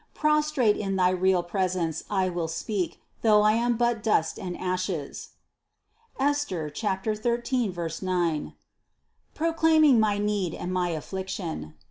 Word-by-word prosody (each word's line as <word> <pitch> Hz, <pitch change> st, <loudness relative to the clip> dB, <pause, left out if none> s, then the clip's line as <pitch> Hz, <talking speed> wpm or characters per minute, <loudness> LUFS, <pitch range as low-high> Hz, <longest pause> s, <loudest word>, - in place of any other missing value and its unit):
Pros 300 Hz, 0 st, +2 dB
trate 240 Hz, -8 st, +3 dB
in 195 Hz, -2 st, -2 dB
thy 180 Hz, -1 st, +3 dB
real 185 Hz, -1 st, +2 dB
presence 175 Hz, -3 st, -1 dB
I 190 Hz, -2 st, +1 dB
will 175 Hz, -2 st, -2 dB
speak, 180 Hz, +3 st, -3 dB, 0.2 s
though 210 Hz, -2 st, +5 dB
I 215 Hz, -, +5 dB
am 235 Hz, +1 st, +1 dB
but 235 Hz, -2 st, +1 dB
dust 205 Hz, -7 st, +1 dB
and 180 Hz, -2 st, -5 dB
ashes 185 Hz, -5 st, -3 dB, 0.9 s
(Esther 270 Hz, -, 0 dB
13, 220 Hz, -, -1 dB, 0.3 s
9) 175 Hz, -5 st, -1 dB, 0.8 s
proclaiming 320 Hz, -4 st, +4 dB
my 210 Hz, -2 st, +2 dB
need 205 Hz, -4 st, -1 dB
and 180 Hz, -, -4 dB
my 180 Hz, -1 st, 0 dB
affliction. 165 Hz, -, -5 dB
195 Hz, 125 wpm, -26 LUFS, 180-235 Hz, 0.9 s, though